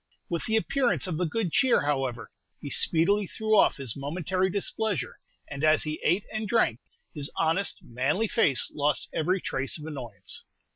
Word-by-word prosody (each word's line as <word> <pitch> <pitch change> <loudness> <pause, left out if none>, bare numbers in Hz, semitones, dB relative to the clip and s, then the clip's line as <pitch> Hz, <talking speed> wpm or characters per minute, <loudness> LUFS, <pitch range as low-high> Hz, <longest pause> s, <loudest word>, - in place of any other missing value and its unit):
With 170 - -1
the 220 - +1
appearance 250 +3 +1
of 175 -4 -2
the 180 - +1
good 190 0 -1
cheer, 255 - +3
however, 135 -5 -1 0.3
he 140 - -7
speedily 195 +5 +3
threw 220 +2 0
off - - +5
his 135 -6 -4
momentary 175 +6 -1
displeasure, 200 - -2 0.3
and 140 0 -6
as 155 0 +4
he 155 0 -4
ate 180 +5 +2
and 215 0 -2
drank, 205 - +2 0.3
his 145 -1 -1
honest, 165 +4 +1
manly 135 - 0
face 145 - +2
lost 150 0 0
every 180 +4 +1
trace 135 -3 -2
of 150 - -9
annoyance. 130 -9 -6
160 Hz, 165 wpm, -27 LUFS, 140-205 Hz, 0.3 s, off